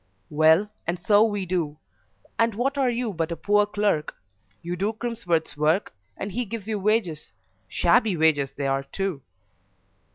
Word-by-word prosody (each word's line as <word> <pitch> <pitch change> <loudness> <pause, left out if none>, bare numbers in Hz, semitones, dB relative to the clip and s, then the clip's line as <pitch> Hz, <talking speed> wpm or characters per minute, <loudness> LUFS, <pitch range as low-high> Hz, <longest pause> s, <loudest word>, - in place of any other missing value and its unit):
"Well, 160 +6 +4 0.2
and 175 +1 0
so 205 +4 +4
we 205 -3 -1
do; 165 -5 -2 0.6
and 230 -2 +2
what 265 +5 0
are 270 -3 +2
you 240 -3 -2
but 165 -1 -2
a - - -1
poor 205 +3 +2
clerk? 205 -7 0 0.5
You 175 +1 -3
do 200 +5 -1
Crimsworth's 220 -8 -2
work, 155 - +1 0.2
and 195 - -4
he 245 +6 -1
gives 220 -2 -6
you 215 -2 -1
wages 195 - 0 0.4
shabby 175 - +2
wages 150 -4 +3
they 140 - -4
are, 135 0 +1
too." 180 +2 -4
190 Hz, 160 wpm, -25 LUFS, 160-215 Hz, 0.6 s, Well